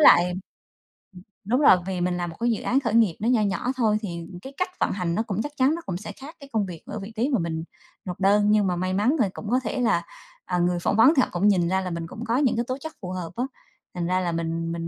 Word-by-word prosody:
lại 180 Hz, -, +7 dB
ừm, 180 Hz, +1 st, -4 dB, 1.1 s
đúng 250 Hz, +7 st, +2 dB
rồi, 275 Hz, -, +7 dB
vì 185 Hz, -2 st, -2 dB
mình 180 Hz, 0 st, 0 dB
làm 175 Hz, -1 st, -2 dB
một 165 Hz, -, -9 dB
cái 240 Hz, 0 st, +2 dB
dự 220 Hz, -, -1 dB
án 265 Hz, -, +2 dB
khởi 230 Hz, -5 st, -2 dB
nghiệp 225 Hz, -7 st, +4 dB
nó 220 Hz, -, -1 dB
nho 245 Hz, -3 st, +4 dB
nhỏ 210 Hz, +5 st, 0 dB
thôi 220 Hz, -4 st, +3 dB
thì 170 Hz, -5 st, -5 dB
cái 270 Hz, +5 st, -9 dB
cách 365 Hz, -, 0 dB
vận -, -, +1 dB
hành 180 Hz, -3 st, -1 dB
nó 220 Hz, -, +1 dB
cũng 210 Hz, -2 st, -2 dB
chắc 295 Hz, -, -4 dB
chắn 270 Hz, +4 st, +3 dB
nó 335 Hz, -, -6 dB
cũng 180 Hz, -, -3 dB
sẽ 210 Hz, +3 st, -7 dB
khác 275 Hz, -, -11 dB
cái 280 Hz, -2 st, -12 dB
công 215 Hz, -2 st, +1 dB
việc 175 Hz, -4 st, -8 dB
ở -, -, -5 dB
vị 200 Hz, +3 st, -8 dB
trí 245 Hz, +5 st, +1 dB
mà 255 Hz, -6 st, +2 dB
mình 160 Hz, -1 st, -2 dB, 0.4 s
nộp 180 Hz, 0 st, -5 dB
đơn. 205 Hz, +2 st, +4 dB
Nhưng 210 Hz, -2 st, +4 dB
mà 180 Hz, -, 0 dB
may 185 Hz, +1 st, -1 dB
mắn 215 Hz, +10 st, +2 dB
thì 215 Hz, -, +3 dB
cũng 210 Hz, -, -7 dB
có 255 Hz, -, +4 dB
thể 220 Hz, -, -2 dB
là, 170 Hz, -7 st, +2 dB, 0.4 s
à, 180 Hz, -1 st, -1 dB
người 175 Hz, 0 st, +1 dB
phỏng 175 Hz, -, 0 dB
vấn 245 Hz, +7 st, +7 dB
thì 260 Hz, -, +5 dB
họ -, -, +1 dB
cũng 175 Hz, +4 st, +2 dB
nhìn 180 Hz, -4 st, +3 dB
ra 190 Hz, +1 st, +1 dB
là 185 Hz, -, -3 dB
mình 170 Hz, -1 st, -4 dB
cũng 220 Hz, +7 st, -7 dB
có 235 Hz, +2 st, +1 dB
những 270 Hz, -4 st, +2 dB
cái 235 Hz, +1 st, 0 dB
tố 255 Hz, +1 st, -2 dB
chất 315 Hz, +2 st, -7 dB
phù 180 Hz, -2 st, -5 dB
hợp 180 Hz, -3 st, -5 dB
á, 245 Hz, -, -1 dB, 0.5 s
thành 175 Hz, -1 st, -2 dB
ra 185 Hz, +1 st, +2 dB
là 175 Hz, -2 st, -1 dB
mình 165 Hz, 0 st, -2 dB
mình 165 Hz, 0 st, -4 dB
200 Hz, 300 wpm, -25 LUFS, 175-235 Hz, 1.1 s, lại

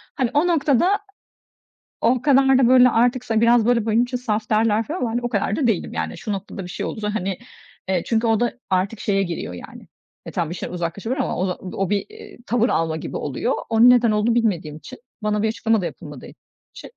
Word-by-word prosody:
hani, 255 Hz, -3 st, 0 dB
o 295 Hz, +5 st, +3 dB
noktada 335 Hz, -, +2 dB, 1.0 s
O 240 Hz, +1 st, +2 dB
kadar 270 Hz, -1 st, +4 dB
da 255 Hz, -3 st, +4 dB
böyle 250 Hz, 0 st, +6 dB
artık 245 Hz, +2 st, +1 dB
sa 225 Hz, -2 st, 0 dB
biraz 235 Hz, -1 st, +4 dB
böyle 235 Hz, -2 st, +2 dB
benim 230 Hz, +2 st, +3 dB
için 250 Hz, 0 st, -3 dB
saf 220 Hz, -3 st, -3 dB
derler 220 Hz, 0 st, +2 dB
falan 320 Hz, -, -4 dB
ama 240 Hz, -, -1 dB
hani, 240 Hz, +2 st, -1 dB
o 240 Hz, -, -2 dB
kadar 205 Hz, -2 st, -1 dB
da 270 Hz, -6 st, +1 dB
değilim 205 Hz, -7 st, -1 dB
yani, 80 Hz, -1 st, -4 dB
şu 210 Hz, -, -4 dB
noktada 195 Hz, 0 st, -6 dB
bir 180 Hz, -, -9 dB
şey -, -, -4 dB
olursa 210 Hz, -1 st, -4 dB
hani, 190 Hz, -2 st, -2 dB, 0.5 s
evet, 185 Hz, -3 st, -1 dB
çünkü 230 Hz, 0 st, 0 dB
o 225 Hz, -1 st, +2 dB
da 240 Hz, 0 st, 0 dB, 0.2 s
artık 190 Hz, +3 st, 0 dB
şeye 195 Hz, -1 st, 0 dB
giriyor 170 Hz, -, -5 dB
yani, 90 Hz, -, -11 dB, 0.4 s
e, -, -, -7 dB
tamam 165 Hz, -3 st, -2 dB
bir 170 Hz, -, -5 dB
şeyden 180 Hz, -, -6 dB
uzaklaşabilir 195 Hz, +9 st, -3 dB
ama -, -, -2 dB
o 185 Hz, -, 0 dB
da 180 Hz, -, -2 dB, 0.2 s
o 195 Hz, -2 st, -1 dB
bir, 205 Hz, -1 st, 0 dB
eee, 435 Hz, 0 st, -13 dB
tavır 240 Hz, +3 st, +1 dB
alma 160 Hz, -1 st, 0 dB
gibi -, -, -5 dB
oluyor. 150 Hz, -, -2 dB, 0.2 s
Onun 230 Hz, +2 st, +6 dB
neden 240 Hz, -2 st, +5 dB
olduğunu 215 Hz, +2 st, +1 dB
bilmediğim 190 Hz, -10 st, 0 dB
için, 255 Hz, +11 st, -12 dB, 0.2 s
bana 210 Hz, 0 st, 0 dB
bir -, -, +2 dB
açıklama 225 Hz, -1 st, 0 dB
da -, -, -3 dB
yapılmadığı -, -, -8 dB, 0.5 s
için, -, -, -11 dB
225 Hz, 225 wpm, -21 LUFS, 195-245 Hz, 1.0 s, böyle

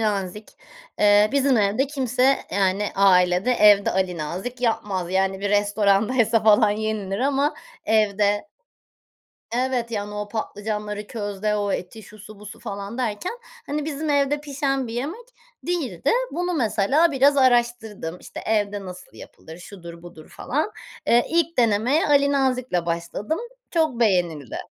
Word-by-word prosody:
Nazik. 210 Hz, -1 st, -2 dB, 0.5 s
Eee, 205 Hz, 0 st, +5 dB
bizim 275 Hz, -2 st, +3 dB
evde 215 Hz, +6 st, +2 dB
kimse, 265 Hz, -1 st, +1 dB
yani, 195 Hz, +1 st, +1 dB
ailede, 185 Hz, +2 st, +4 dB
evde 210 Hz, -4 st, +5 dB
Ali 185 Hz, -2 st, -1 dB
Nazik 185 Hz, +11 st, -5 dB
yapmaz. 195 Hz, -6 st, -1 dB
Yani, 190 Hz, 0 st, 0 dB
bir 200 Hz, 0 st, -2 dB
restorandaysa 210 Hz, +3 st, +2 dB
falan 215 Hz, 0 st, +5 dB
yenilir 210 Hz, -2 st, -3 dB
ama 280 Hz, +2 st, +1 dB, 0.3 s
evde 205 Hz, 0 st, +1 dB, 1.1 s
Evet 245 Hz, -1 st, -1 dB
yani 205 Hz, -2 st, -4 dB
o 210 Hz, 0 st, -4 dB
patlıcanları 210 Hz, -1 st, -4 dB
közde 210 Hz, -1 st, -3 dB
o 205 Hz, -1 st, -1 dB
eti 185 Hz, +5 st, -5 dB
şusu 210 Hz, +1 st, -13 dB
busu 210 Hz, 0 st, -10 dB
falan 200 Hz, +1 st, -6 dB
derken, 235 Hz, -, -2 dB, 0.3 s
hani, 295 Hz, 0 st, -3 dB
bizim 305 Hz, 0 st, -3 dB
evde 285 Hz, +1 st, +1 dB
pişen 275 Hz, -3 st, -2 dB
bir 225 Hz, -, -7 dB
yemek 320 Hz, -, -5 dB, 0.4 s
değildi. 345 Hz, -7 st, -1 dB, 0.2 s
Bunu 355 Hz, +1 st, -2 dB
mesela 270 Hz, +6 st, +2 dB
biraz 280 Hz, +2 st, +4 dB
araştırdım. 235 Hz, -9 st, +1 dB
İşte, -, -, -9 dB
evde 205 Hz, -2 st, 0 dB
nasıl 180 Hz, -1 st, -11 dB
yapılır, 160 Hz, +1 st, -12 dB
şudur 170 Hz, -2 st, -11 dB
budur 170 Hz, -3 st, -13 dB
falan. 305 Hz, +10 st, -3 dB, 0.4 s
Eee, 240 Hz, +1 st, +4 dB
ilk 335 Hz, -1 st, 0 dB
denemeye 235 Hz, +6 st, +2 dB
Ali 280 Hz, -1 st, +4 dB
Nazikle 255 Hz, -10 st, 0 dB
başladım. 170 Hz, -, -3 dB, 0.3 s
Çok 315 Hz, -8 st, 0 dB
beğenildi. 175 Hz, -, 0 dB
215 Hz, 135 wpm, -23 LUFS, 200-260 Hz, 1.1 s, Eee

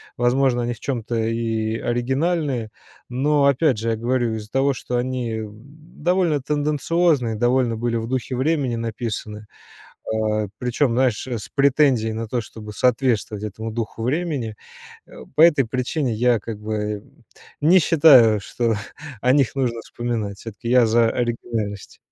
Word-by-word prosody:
возможно, 120 Hz, 0 st, +2 dB
они 120 Hz, 0 st, -1 dB
в 115 Hz, -, -13 dB
чём-то 120 Hz, -2 st, -3 dB
и 115 Hz, -1 st, -1 dB
оригинальные. 130 Hz, 0 st, -1 dB, 0.4 s
Но 140 Hz, +3 st, +2 dB
опять 140 Hz, -3 st, +3 dB
же, 115 Hz, +1 st, -2 dB
я 115 Hz, -, +1 dB
говорю, 120 Hz, 0 st, 0 dB
из-за 110 Hz, 0 st, -8 dB
того 135 Hz, +1 st, +2 dB
что 125 Hz, -1 st, -3 dB
они 120 Hz, -2 st, -2 dB
довольно 150 Hz, -, -2 dB
тенденциозны, 150 Hz, -2 st, +1 dB
довольно 120 Hz, 0 st, +1 dB
были 120 Hz, +1 st, -1 dB
в 115 Hz, -1 st, -2 dB
духе 130 Hz, 0 st, -2 dB
времени 135 Hz, -2 st, 0 dB
написаны, 110 Hz, -2 st, -5 dB, 0.7 s
а, 110 Hz, -1 st, 0 dB
причем, 125 Hz, +2 st, 0 dB
знаешь, 125 Hz, -2 st, +1 dB
с 120 Hz, -5 st, -5 dB
претензией 140 Hz, -5 st, +3 dB
на 115 Hz, +1 st, -4 dB
то, 120 Hz, +2 st, -1 dB
чтобы 105 Hz, -1 st, -10 dB
соответствовать 115 Hz, -3 st, 0 dB
этому 110 Hz, +2 st, -6 dB
духу 115 Hz, 0 st, -4 dB
времени. 135 Hz, -5 st, -2 dB, 0.8 s
По -, -, +3 dB
этой 155 Hz, -5 st, +6 dB
причине 130 Hz, +2 st, -1 dB
я 120 Hz, +1 st, +2 dB
как 110 Hz, +1 st, -7 dB
бы 105 Hz, -1 st, -3 dB, 0.6 s
не 170 Hz, +6 st, +6 dB
считаю, 140 Hz, -10 st, +6 dB
что 115 Hz, +3 st, -1 dB, 0.5 s
о 125 Hz, +1 st, +3 dB
них 140 Hz, -4 st, +2 dB
нужно 120 Hz, -4 st, -1 dB
вспоминать. 115 Hz, -5 st, -4 dB
Всё-таки 115 Hz, +1 st, -7 dB
я 125 Hz, -1 st, +5 dB
за 115 Hz, +1 st, +3 dB
оригинальность. 115 Hz, -4 st, -3 dB
120 Hz, 140 wpm, -22 LUFS, 110-135 Hz, 0.8 s, этой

